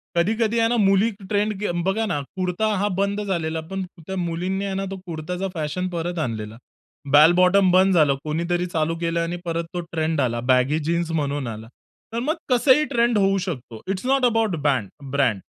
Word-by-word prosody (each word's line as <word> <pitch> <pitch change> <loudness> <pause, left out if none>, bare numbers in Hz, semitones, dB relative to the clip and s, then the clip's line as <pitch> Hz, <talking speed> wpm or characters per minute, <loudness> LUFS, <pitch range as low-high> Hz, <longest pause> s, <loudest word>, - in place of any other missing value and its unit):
कधी-कधी 220 +6 +1
आहे 225 - +4
ना, 240 - +1
मुली 195 +3 +4 0.2
ट्रेंड 210 +1 +1
के 210 -4 -1
बघा 220 +4 +1
ना 150 - -1 0.2
कुर्ता 185 +3 -1
हा 205 +2 +1
बंद 200 +1 0
झालेला, 165 -4 -2
पण 195 0 -2 0.2
त्या 190 - -4
मुलींनी 180 +3 -2
आहे 195 - -3
ना, 195 0 -2
तो 195 - -5
कुर्ताचा 175 +3 -4
फॅशन 160 +3 -2
परत 175 0 -3
आणलेला. 110 -5 -4 0.6
बेल 155 +3 +8
बॉटम 185 +1 +4
बंद 190 +1 +5
झालं. 145 -4 +4
कोणीतरी 170 +3 -1
चालू 165 -1 -1
केलं 170 0 -1
आणि 170 +1 -2
परत 170 0 -2
तो 175 - -2
ट्रेंड 160 -2 0
आला 120 -2 0
बॅगी 135 +5 +2
जीन्स 170 0 0
म्हणून 145 -4 -1
आला. 110 0 -7 0.5
तर 230 - -1
मग 295 +7 0
कसंही 260 +4 +4
ट्रेंड 235 -1 +3
होऊ 195 0 +3
शकतो. 130 - -5
It's 195 +4 -3
not 270 0 +3
about 225 -6 +2
band 130 -9 +1 0.2
brand. 130 -7 +1
175 Hz, 190 wpm, -23 LUFS, 155-200 Hz, 0.6 s, बेल